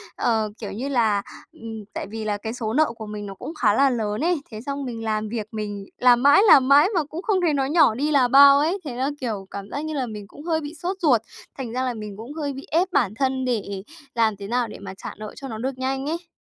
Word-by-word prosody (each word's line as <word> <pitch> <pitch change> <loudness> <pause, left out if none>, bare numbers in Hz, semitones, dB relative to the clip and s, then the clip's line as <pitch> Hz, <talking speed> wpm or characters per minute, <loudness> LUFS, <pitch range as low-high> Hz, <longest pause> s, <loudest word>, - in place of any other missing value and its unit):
Ờ, 220 -2 +1
kiểu 210 - -6
như 255 +7 -4
là, 220 -6 +2 0.3
ừm, 225 -2 -8
tại - - -4
vì 220 +1 -6
là 210 -1 -1
cái 220 +2 -5
số 225 -3 -3
nợ 310 +3 +4
của 220 - -7
mình 210 0 -6
nó 195 - -6
cũng 320 - -7
khá 210 -7 +3
là 275 +4 +4
lớn 215 -1 -2
ấy. 345 -3 +1
Thế 215 0 -7
xong 280 +1 -4
mình 230 -2 -5
làm 215 -1 -1
việc 220 -2 -4
mình 205 -2 -5
làm 245 0 +5
mãi, 285 +6 +7
làm 265 -8 +7
mãi 285 +5 +7
mà 330 - +2
cũng 310 +4 -7
không 395 -4 +1
thấy 330 -4 +2
nó 270 -1 +1
nhỏ 290 -7 +4
đi 295 +4 0
là 265 -4 +4
bao 280 +2 +8
ấy, 340 +7 +1
thế 250 -4 -5
là, 265 +3 0
kiểu, 210 -6 -3
cảm 200 0 -7
giác 285 +6 -4
như 315 - -4
là 265 -3 -1
mình 210 -3 -8
cũng 290 - -13
hơi 320 -2 0
bị 295 +2 -7
sốt 375 +2 -2
ruột. 250 -9 +4 0.4
Thành 245 -4 -5
ra 255 +1 -1
là 250 -1 -1
mình 210 -3 -7
cũng 235 +7 -8
hơi 290 -3 -3
bị 270 +1 -8
ép 360 +4 +2
bản 220 - +2
thân 260 0 0
để 200 -5 -2 0.3
làm 225 -2 +2
thế 200 - -7
nào 240 +2 0
để 210 - -10
mà 195 -1 -8
trả - - -8
nợ 215 0 -8
cho 275 - -8
nó 220 -4 -6
được 255 +3 -3
nhanh 265 +1 -2
ấy. 335 +1 -4
245 Hz, 275 wpm, -23 LUFS, 215-285 Hz, 0.4 s, bao